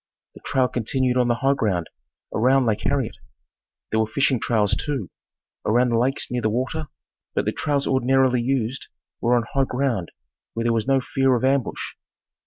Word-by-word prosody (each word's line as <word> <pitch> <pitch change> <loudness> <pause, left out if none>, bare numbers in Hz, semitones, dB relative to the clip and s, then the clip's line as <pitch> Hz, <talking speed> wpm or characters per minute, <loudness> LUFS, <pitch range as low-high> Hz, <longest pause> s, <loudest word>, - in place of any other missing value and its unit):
The - - -14
trail 130 -2 +2
continued 125 +1 0
on 125 -1 +3
the 120 - +2
high 135 +3 +2
ground 95 -10 -1 0.5
around 130 +3 +3
Lake 110 -3 0
Harriet. 135 -5 0 0.7
There 110 - +2
were 110 - +2
fishing 130 +2 +1
trails, 105 -4 +1
too, 135 - -3 0.5
around 120 +4 +3
the 115 -1 +2
lakes 135 +3 0
near 125 0 -1
the 110 - +1
water, 130 +7 -2 0.5
but - - +1
the - - +1
trails 140 -1 -1
ordinarily 130 -1 +3
used 130 0 -1 0.3
were 120 +1 +3
on 120 - +2
high 135 -1 +3
ground 125 -9 -1 0.5
where 115 - -1
there 115 0 +2
was 115 +1 -1
no 135 -1 +3
fear 135 0 +2
of 120 - 0
ambush. 135 -2 0
125 Hz, 180 wpm, -23 LUFS, 115-135 Hz, 0.7 s, on